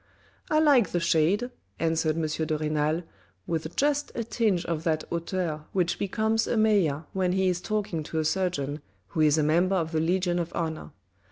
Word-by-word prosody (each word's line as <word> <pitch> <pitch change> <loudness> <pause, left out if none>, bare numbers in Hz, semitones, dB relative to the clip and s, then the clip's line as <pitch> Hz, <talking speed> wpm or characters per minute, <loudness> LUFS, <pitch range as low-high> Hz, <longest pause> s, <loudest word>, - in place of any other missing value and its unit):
" - - -34
I 310 - +2
like 280 - +5
the 175 - +2
shade," 170 +9 +2 0.3
answered 160 -1 +1
M. 165 - -1 0.2
de 155 -1 0
Renal, 155 +2 0 0.4
with 160 0 -3
just 290 0 +1
a 230 - -1
tinge 215 -6 0
of 165 -2 -2
that 155 -2 0
hauteur 170 -2 -2
which 180 -3 0
becomes 220 +3 0
a 235 - 0
mayor 195 -9 +2
when 185 -2 +1
he 190 0 +2
is 180 -1 -1
talking 210 -6 -2
to 160 - -5
a 155 - +1
surgeon, 150 -5 -1 0.3
who 160 - -1
is 150 0 +4
a 155 - +2
member 175 +5 +2
of 165 -3 -1
the 160 - 0
Legion 175 +2 +1
of 170 -1 -3
Honour. 160 -2 -3
170 Hz, 190 wpm, -27 LUFS, 160-195 Hz, 0.4 s, like